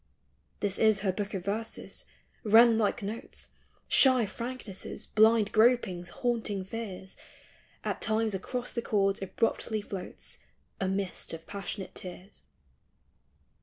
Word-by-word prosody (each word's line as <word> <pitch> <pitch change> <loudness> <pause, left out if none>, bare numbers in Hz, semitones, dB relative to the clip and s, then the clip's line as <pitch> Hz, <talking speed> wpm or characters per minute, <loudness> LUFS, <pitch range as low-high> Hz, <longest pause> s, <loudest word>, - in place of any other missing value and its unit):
This 200 -2 0
is 215 -3 +4
her 195 -2 +2
Book 200 +2 -4
of 185 -2 -4
Verses 220 +3 -3 0.2
— - - -37
wren 225 +1 +7
like 220 0 +1
notes, 215 +4 -6 0.4
Shy 255 -4 +6
franknesses, 235 -2 -4
blind 220 -1 +4
gropings, 215 -6 +3
haunting 225 -5 -1
fears; 190 -3 -6 0.7
At - - -2
times 220 -1 +2
across 245 +6 -2
the 235 - -1
chords 195 -3 +1
abruptly 220 +2 0
floats 200 -2 -6 0.4
A 190 - 0
mist 195 -2 -2
of 165 0 -7
passionate 200 -1 -5
tears. 185 +2 -8
210 Hz, 125 wpm, -30 LUFS, 195-225 Hz, 0.7 s, wren